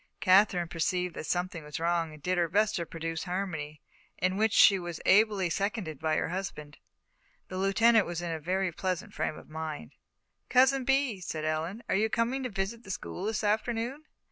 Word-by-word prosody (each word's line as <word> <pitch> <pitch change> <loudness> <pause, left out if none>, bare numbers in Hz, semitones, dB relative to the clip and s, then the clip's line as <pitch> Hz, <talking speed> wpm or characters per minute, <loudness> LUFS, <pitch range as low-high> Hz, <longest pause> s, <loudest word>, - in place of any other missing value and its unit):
Katherine 185 -2 +4
perceived 180 +2 -1
that - - -6
something 175 -2 -2
was 150 +1 -6
wrong 170 -1 0
and 150 -2 -14
did 180 0 +1
her 170 -1 +1
best 210 +4 +2
to 170 -2 -3
produce 165 0 -4
harmony, 160 -6 -4 0.3
in 185 +1 0
which 220 +2 +2
she 195 -2 +7
was 175 -2 -6
ably 205 -2 +4
seconded 195 - -2
by 155 -1 0
her - - 0
husband. 170 -5 -6 0.7
The 185 - -4
Lieutenant 215 +3 +4
was 175 0 -3
in 175 -1 -3
a 160 - -3
very 185 +3 -1
pleasant 185 +1 -3
frame 155 - -2
of - - -13
mind. 155 - -6 0.6
"Cousin 265 +1 +4
Bee," 270 -5 +1
said 155 -3 -4
Ellen, 160 +8 -2
"are - - 0
you 215 +3 +2
coming 240 +4 0
to 255 - -3
visit 195 +3 -3
the 195 - -13
school 190 0 -5
this 215 0 -1
afternoon?" 230 +7 -1
185 Hz, 190 wpm, -29 LUFS, 165-215 Hz, 0.7 s, she